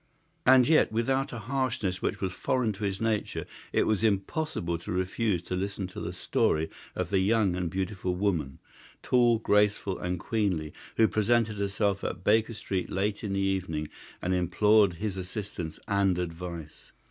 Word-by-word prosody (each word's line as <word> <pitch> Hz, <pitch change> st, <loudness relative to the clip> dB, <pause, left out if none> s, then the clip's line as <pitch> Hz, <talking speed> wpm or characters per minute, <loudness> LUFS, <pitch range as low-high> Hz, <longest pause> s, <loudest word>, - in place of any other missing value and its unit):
And 130 Hz, -1 st, +7 dB
yet 155 Hz, -6 st, +4 dB
without 130 Hz, +5 st, 0 dB
a 120 Hz, -, -5 dB
harshness 115 Hz, -6 st, -1 dB
which -, -, -2 dB
was 95 Hz, -2 st, -1 dB
foreign 120 Hz, -1 st, 0 dB
to 100 Hz, +2 st, -8 dB
his 95 Hz, -1 st, -2 dB
nature 110 Hz, -2 st, -1 dB, 0.3 s
it -, -, +2 dB
was 110 Hz, -1 st, +1 dB
impossible 100 Hz, -, 0 dB
to 85 Hz, -, -7 dB
refuse 95 Hz, +1 st, 0 dB
to 90 Hz, -, -3 dB
listen 100 Hz, +1 st, -3 dB
to -, -, -8 dB
the -, -, -3 dB
story 80 Hz, +1 st, 0 dB, 0.2 s
of -, -, -3 dB
the 95 Hz, -, +3 dB
young 100 Hz, -1 st, +2 dB
and 90 Hz, -2 st, -1 dB
beautiful 95 Hz, 0 st, -2 dB
woman, 85 Hz, -8 st, -1 dB, 0.5 s
tall, 120 Hz, -2 st, +4 dB
graceful, 105 Hz, -3 st, +2 dB
and 90 Hz, 0 st, -2 dB
queenly, 90 Hz, -10 st, -1 dB, 0.2 s
who 110 Hz, -, +6 dB
presented 110 Hz, 0 st, +1 dB
herself 100 Hz, 0 st, 0 dB
at 90 Hz, 0 st, -4 dB
Baker 110 Hz, +3 st, +3 dB
Street 100 Hz, -4 st, -3 dB
late 100 Hz, +3 st, -1 dB
in 100 Hz, -2 st, -2 dB
the 100 Hz, -, 0 dB
evening 90 Hz, -6 st, -1 dB, 0.3 s
and 90 Hz, -, +1 dB
implored 95 Hz, +3 st, +4 dB
his 100 Hz, +1 st, -3 dB
assistance 90 Hz, -3 st, -5 dB
and 100 Hz, -2 st, +2 dB
advice. 85 Hz, -2 st, -6 dB
100 Hz, 165 wpm, -28 LUFS, 90-110 Hz, 0.5 s, And